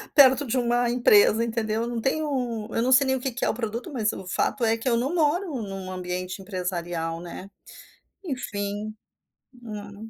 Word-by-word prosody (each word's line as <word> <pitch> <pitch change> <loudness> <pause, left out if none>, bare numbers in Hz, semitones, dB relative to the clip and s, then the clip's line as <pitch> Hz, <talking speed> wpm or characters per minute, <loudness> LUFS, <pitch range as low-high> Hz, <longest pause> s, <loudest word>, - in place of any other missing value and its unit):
perto 275 0 +7
de 255 - 0
uma 240 0 +2
empresa", 230 -2 +5
entendeu. 225 -1 -1
Não 235 -1 -3
tenho 255 -6 -1
eu 230 - +1
não 255 +2 +2
sei 260 +2 +6
nem 265 0 +2
o - - -2
que 260 0 -2
que 245 - -2
é - - +2
o - - +1
produto, 235 +6 -4
mas 215 -4 +1
o 190 - -8
fato 230 +7 -1
é 225 0 +3
que 250 +3 -1
eu 235 - +3
não 270 +8 -1
moro 335 +3 +2
em 235 - -5
um 190 -1 -6
ambiente 185 +1 -4
empresarial, 175 -3 -3
né. 175 +3 -8 0.7
Enfim. 210 - -4 0.7
Hum. 210 -1 -8
225 Hz, 190 wpm, -25 LUFS, 200-255 Hz, 0.7 s, perto